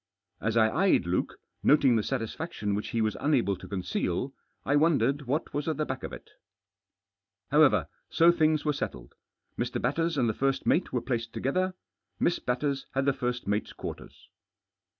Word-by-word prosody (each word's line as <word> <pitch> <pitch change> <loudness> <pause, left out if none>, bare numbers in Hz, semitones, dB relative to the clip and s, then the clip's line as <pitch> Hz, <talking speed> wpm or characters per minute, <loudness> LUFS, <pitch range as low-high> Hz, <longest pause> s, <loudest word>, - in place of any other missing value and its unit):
As 115 +1 -1
I 110 -1 +6
eyed 190 - +3
Luke, 85 +1 -1 0.2
noting 140 -4 +5
the 110 - +3
satisfaction 115 -1 -3
which 105 +1 -2
he 115 -2 -1
was 110 -1 0
unable 130 -9 +2
to - - -11
conceal, 95 +5 -2 0.3
I 140 - +2
wondered 145 -3 +2
what 145 +6 0
wgs 145 +1 -3
at 160 -3 -1
the 155 - 0
back - - -4
of - - -6
it - - -11 1.2
However, 135 - +5 0.2
so 170 +1 +5
things 155 -3 +2
were 150 - +2
settled. - - -5 0.5
Mr. - - -1
Hatters 165 +5 0
and 125 -3 +2
the 110 - +1
first 135 +4 0
mate 175 - +2
were 125 - 0
placed 115 -2 -3
together. 185 +7 -1 0.4
Mi§s 170 - +1
Batters 135 +2 -1
had 135 0 +1
the 140 - +3
first 125 -2 -3
mate's 105 +2 -1
quarters. - - -9
135 Hz, 170 wpm, -28 LUFS, 115-150 Hz, 1.2 s, I